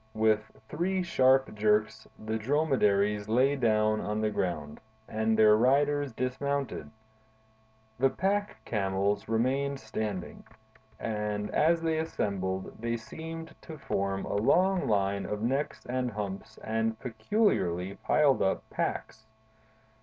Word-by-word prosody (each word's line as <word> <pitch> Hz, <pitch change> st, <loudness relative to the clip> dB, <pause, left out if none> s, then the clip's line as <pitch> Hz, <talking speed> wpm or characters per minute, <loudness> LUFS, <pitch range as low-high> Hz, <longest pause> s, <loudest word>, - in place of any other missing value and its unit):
With 110 Hz, 0 st, +2 dB, 0.2 s
three 180 Hz, +6 st, -1 dB
sharp 135 Hz, -5 st, +3 dB
jerks, 110 Hz, +1 st, +1 dB
the 110 Hz, +1 st, -3 dB
dromedaries 105 Hz, -7 st, +1 dB
lay 130 Hz, +5 st, +3 dB
down 110 Hz, -4 st, +2 dB
on 105 Hz, +1 st, -2 dB
the 110 Hz, 0 st, 0 dB
ground, 85 Hz, -7 st, -3 dB, 0.3 s
and 110 Hz, 0 st, 0 dB
their 110 Hz, -1 st, +7 dB
riders 140 Hz, +4 st, +2 dB
dismounted. 135 Hz, +3 st, -2 dB, 1.1 s
The 135 Hz, +1 st, +4 dB
pack 205 Hz, +6 st, -1 dB
camels 100 Hz, -1 st, -1 dB
remained 135 Hz, +5 st, 0 dB
standing, 110 Hz, -4 st, -5 dB, 0.6 s
and 105 Hz, -1 st, -2 dB
as 165 Hz, +2 st, +3 dB
they 160 Hz, -1 st, +1 dB
assembled 95 Hz, -, -2 dB
they 115 Hz, +1 st, -1 dB
seemed 160 Hz, +7 st, -8 dB
to 160 Hz, -, -9 dB
form 100 Hz, -7 st, -2 dB
a -, -, -4 dB
long 185 Hz, -, +3 dB
line 100 Hz, -2 st, +1 dB
of 105 Hz, +1 st, -3 dB
necks 135 Hz, +5 st, -1 dB
and 125 Hz, 0 st, -1 dB
humps 100 Hz, -3 st, -6 dB
and 110 Hz, 0 st, -1 dB
peculiarly 110 Hz, -, 0 dB
piled 145 Hz, -4 st, +3 dB
up 95 Hz, -, 0 dB
packs. 110 Hz, 0 st, -3 dB
110 Hz, 120 wpm, -29 LUFS, 105-140 Hz, 1.1 s, their